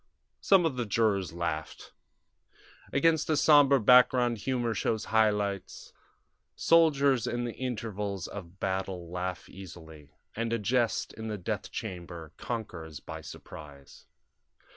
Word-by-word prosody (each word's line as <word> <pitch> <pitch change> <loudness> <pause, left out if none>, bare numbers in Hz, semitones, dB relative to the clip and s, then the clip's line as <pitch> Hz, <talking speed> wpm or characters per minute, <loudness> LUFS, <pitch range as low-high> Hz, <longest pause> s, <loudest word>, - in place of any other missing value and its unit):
Some 190 -3 +4
of 145 -6 -1
the 120 - -1
jurors 100 -5 +1
laughed. 80 -2 -5 1.0
Against 160 +2 +2
a 155 - +2
sombre 145 -2 +6
background 125 0 +5
humor 120 -1 -1
shows 110 +1 -1
high 110 -1 +5
lights. 100 -2 -4 0.6
Soldiers 140 -7 +3
in 120 0 -2
the 120 -1 -4
intervals 105 -6 -4
of 95 -2 -9
battle 95 -3 -3
laugh 90 0 -4
easily, 80 -5 -12 0.3
and 115 +1 -2
a - - +2
jest 115 +2 0
in 110 0 -7
the 105 -1 -3
death 90 - -4
chamber 85 -3 -7
conquers 85 - -6
by - - -8
surprise. 70 -2 -12
105 Hz, 125 wpm, -29 LUFS, 90-125 Hz, 1.0 s, sombre